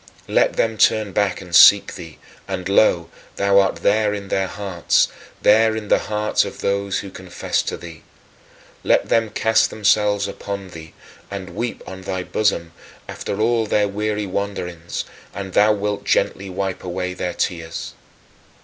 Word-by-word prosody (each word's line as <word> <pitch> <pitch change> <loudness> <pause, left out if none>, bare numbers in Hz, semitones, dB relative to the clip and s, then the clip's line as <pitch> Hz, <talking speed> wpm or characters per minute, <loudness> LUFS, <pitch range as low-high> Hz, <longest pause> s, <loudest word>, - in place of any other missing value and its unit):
Let - - +2
them 110 -1 0
turn 105 -2 +3
back 100 -2 0
and 90 -2 -4
seek - - +8
thee 80 -4 -10 0.3
and 90 -2 -4
lo, 95 -4 +3 0.2
thou 100 0 +4
art 95 -1 +2
there 105 0 +2
in 100 -1 -7
their 95 -1 0
hearts, 95 -4 0 0.3
there 110 +1 +5
in 105 -2 -5
the - - +4
hearts 105 0 0
of - - -8
those 100 -1 -1
who 100 - -9
confess 95 -1 -2
to - - -4
thee. 85 -2 -11 0.8
Let - - +2
them 115 -1 +2
cast 110 +1 +2
themselves 105 -1 +2
upon 100 -1 -6
thee, 80 -2 -11 0.4
and 95 -2 -6
weep 120 0 -4
on 95 0 -9
thy 95 -1 -3
bosom, 90 -5 0 0.4
after 100 - -5
all 115 0 +2
their 105 0 +2
weary 105 +1 -2
wanderings; 90 -4 -4 0.3
and 95 -1 -6
thou 105 +1 +5
wilt 105 -1 -2
gently 95 0 0
wipe 95 0 -3
away 90 0 -3
their 90 -1 -4
tears. 80 -3 -3
100 Hz, 160 wpm, -21 LUFS, 90-105 Hz, 0.8 s, seek